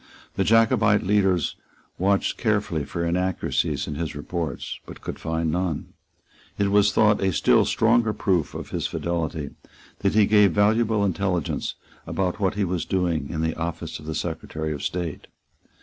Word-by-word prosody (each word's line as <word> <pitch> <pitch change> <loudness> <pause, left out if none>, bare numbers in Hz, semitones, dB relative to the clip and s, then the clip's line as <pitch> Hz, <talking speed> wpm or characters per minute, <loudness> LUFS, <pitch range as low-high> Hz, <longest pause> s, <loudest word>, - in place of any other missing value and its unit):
The - - +1
Jacobite 110 -2 +4
leaders 95 -4 +2 0.4
watched 100 +2 +2
carefully 100 -9 0
for 85 +2 -3
inaccuracies 85 -4 0
in 75 - -5
his 80 +1 -4
reports, 80 +1 -4
but - - -10
could - - -6
find 80 0 -1
none. 85 -3 -2 0.6
It 100 -1 +1
was 100 0 +4
thought 105 -1 +3
a 95 -1 +2
still - - +4
stronger 115 0 +3
proof 90 -7 0
of - - -7
his - - -1
fidelity 80 -4 -3 0.5
that 100 +1 0
he 105 -1 +6
gave 105 -3 +5
valuable 105 +1 +3
intelligence 95 -4 -1 0.3
about 90 -2 -1
what 100 0 0
was 90 -4 0
doing 85 -6 -1
in 80 - -3
the 80 0 0
office 85 0 -4
of 75 - -12
the 80 - -3
Secretary 80 +2 -3
of 70 - -6
State. 85 -4 -4
90 Hz, 155 wpm, -24 LUFS, 80-100 Hz, 0.6 s, he